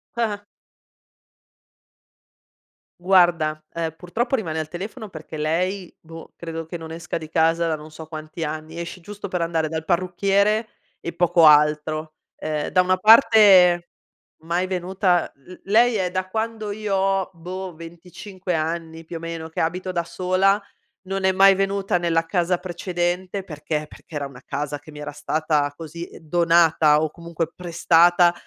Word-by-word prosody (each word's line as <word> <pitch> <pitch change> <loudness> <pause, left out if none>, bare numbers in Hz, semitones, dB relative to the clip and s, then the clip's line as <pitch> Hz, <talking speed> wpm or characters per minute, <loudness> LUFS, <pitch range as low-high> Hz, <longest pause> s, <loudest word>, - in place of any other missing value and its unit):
Ah-ah. 215 -3 -2 2.6
Guarda, 175 -4 +3
ehm, 165 -2 -2
purtroppo 225 +10 -2
rimane 165 -10 -3
al 155 - -3
telefono 205 +7 -7
perché 155 -3 -9
lei, 180 +5 -2
boh, 165 0 -12
credo 165 -1 -6
che 160 - -8
non 160 -1 -7
esca 165 +1 -4
di 160 -2 -9
casa 165 +1 +2
da 160 -2 -1
non 155 +1 -12
so 155 0 -10
quanti 155 +1 -7
anni, 155 +1 -5
esce 170 +2 -6
giusto 205 +3 -8
per 180 - -2
andare 165 -2 0
dal 160 0 -4
parrucchiere 195 +5 +1 0.3
e 170 - -6
poco 170 -1 +4
altro. 155 +1 +3 0.2
Ehm, 150 -1 -2
da 185 - +3
una 185 +1 +2
parte 200 -5 +6 0.5
mai 175 +3 0
venuta 185 -1 0
l 140 +6 -16
lei 230 +4 +4
è 185 -3 0
da 185 +1 -2
quando 220 +1 -3
io 205 -1 -2
ho, 195 0 +1
boh, 180 +2 -7
venticinque 180 +3 -7
anni 165 0 -3
più 165 - -7
o - - -4
meno 165 -1 -6
che - - -4
abito 180 +3 -2
da 170 -1 -1
sola, 185 +3 +1 0.4
non 195 0 -4
è 190 - +4
mai 195 +1 +6
venuta 195 -1 0
nella 165 -1 +1
casa 175 +1 0
precedente 180 +1 -3
perché? 150 -2 -4
Perché - - -15
era 145 -1 -2
una 135 -2 -10
casa 145 +1 -4
che 155 - -14
mi 150 -1 -10
era 145 0 -6
stata, 150 0 0
così, 165 +2 -8
donata 165 -2 +4
o 155 - -1
comunque 170 0 -5
prestata 175 0 +4
170 Hz, 155 wpm, -22 LUFS, 160-185 Hz, 2.6 s, parte